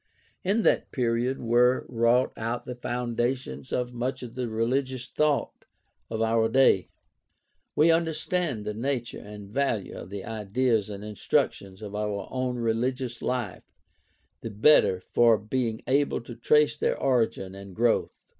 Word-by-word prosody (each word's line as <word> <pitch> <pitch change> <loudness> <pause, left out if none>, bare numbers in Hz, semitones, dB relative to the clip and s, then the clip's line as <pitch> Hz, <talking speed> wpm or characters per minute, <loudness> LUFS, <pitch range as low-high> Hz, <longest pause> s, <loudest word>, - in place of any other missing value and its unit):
In 205 +4 +1
that - - +2
period 125 +1 0
were 125 +2 +3
wrought 120 +1 +2
out 115 +2 -3
the 125 - -5
foundations 125 +1 -3
of 125 0 -1
much 125 +2 -3
of 120 -2 -8
the 125 -2 -3
religious 130 +3 -1
thought 150 -1 0 0.5
of 110 0 -1
our 115 0 +2
day. 115 -7 +4 0.9
We 160 +3 +5
understand 165 -6 0
the 105 - -2
nature 120 +1 -3
and 105 -1 -10
value 120 -5 -1
of 90 - -8
the 100 -1 -6
ideas 110 0 0
and 100 0 -7
institutions 100 -1 -1
of 105 -1 -7
our 105 -2 -3
own 130 -1 -2
religious 120 +2 -1
life 120 -7 -3 0.7
the 115 - -5
better 105 -4 +4
for 115 +2 +4
being 110 +1 -2
able 140 0 +1
to 120 +1 -9
trace 150 +3 +3
their - - -1
origin 115 -7 0
and 100 -1 -10
growth. 115 0 +1
120 Hz, 145 wpm, -27 LUFS, 110-130 Hz, 0.9 s, We